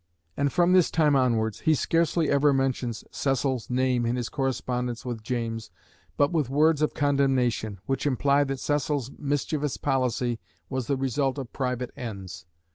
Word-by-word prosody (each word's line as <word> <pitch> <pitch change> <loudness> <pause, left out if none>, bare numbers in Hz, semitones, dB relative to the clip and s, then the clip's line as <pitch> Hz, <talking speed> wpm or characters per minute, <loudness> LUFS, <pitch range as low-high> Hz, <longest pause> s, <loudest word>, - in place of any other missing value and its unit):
And 140 -1 +1
from 175 +4 +3
this 185 -3 +5
time 150 -3 +3
onwards 115 -5 +1
he 160 - +3
scarcely 165 +1 +1
ever 140 0 +4
mentions 130 -4 -1
Cecil's 135 -3 -1
name 125 -1 +1
in 120 +1 0
his 120 -2 -3
correspondence 125 -2 -2
with 120 -3 -4
James 115 -1 -3 0.5
but 145 - +3
with 155 -7 0
words 150 +2 +3
of 155 - +1
condemnation, 130 -7 +1
which 135 +2 -1
imply 140 +1 +3
that 135 -1 -3
Cecil's 145 -3 -1
mischievous 145 0 -1
policy 125 -3 0 0.3
was 130 -3 -2
the 140 - +1
result 135 +1 0
of 130 -4 -6
private 125 -2 -2
ends. 100 -8 -7
135 Hz, 155 wpm, -26 LUFS, 120-145 Hz, 0.5 s, this